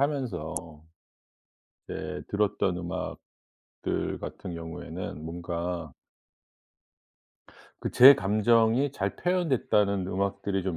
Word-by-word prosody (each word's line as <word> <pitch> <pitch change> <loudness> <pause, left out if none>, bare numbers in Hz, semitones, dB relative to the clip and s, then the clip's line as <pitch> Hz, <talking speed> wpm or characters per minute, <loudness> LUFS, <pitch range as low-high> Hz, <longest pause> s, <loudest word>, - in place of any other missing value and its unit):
하면서 130 - -1 1.3
이제 - - -5
들었던 100 -3 0
음악들 90 +1 -6 0.8
같은 90 -3 -6
경우에는 80 -2 -6
뭔가 85 -1 -4 1.9
그 - - -2
제 135 +3 +10
감정이 115 +6 +3
잘 - - -2
표현됐다는 120 - +1
음악들이 100 +1 -1
좀 90 -2 -2
100 Hz, 195 characters per minute, -28 LUFS, 90-115 Hz, 1.9 s, 제